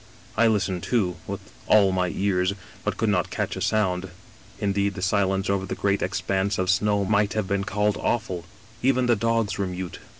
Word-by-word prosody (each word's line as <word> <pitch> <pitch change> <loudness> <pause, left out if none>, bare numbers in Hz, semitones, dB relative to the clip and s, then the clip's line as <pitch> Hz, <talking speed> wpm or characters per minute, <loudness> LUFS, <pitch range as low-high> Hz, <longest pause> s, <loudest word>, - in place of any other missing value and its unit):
I 115 +1 +4
listened 95 -4 +1
too, 95 -7 0
with 100 +1 -4 0.2
* - - -23
all 100 -2 +4
my 90 -1 +1
ears,' 95 0 +1 0.3
but - - -2
could - - +1
not - - +1
catch - - -2
a - - -5
sound; 95 -3 +1 0.5
indeed 100 0 0
the 95 - -5
silence 95 0 +1
over 100 -1 0
the - - -3
great 100 0 +1
expanse 95 +2 0
of 95 0 +2
snow 100 +1 +2
might 105 0 +2
have 110 -3 -1
been 100 0 0
called 105 0 +1
awful; 95 -7 -1 0.4
even 130 -1 +3
the 120 -1 +4
dogs 115 -1 0
were 100 - 0
mute. 90 0 -5
100 Hz, 195 wpm, -25 LUFS, 95-105 Hz, 0.5 s, I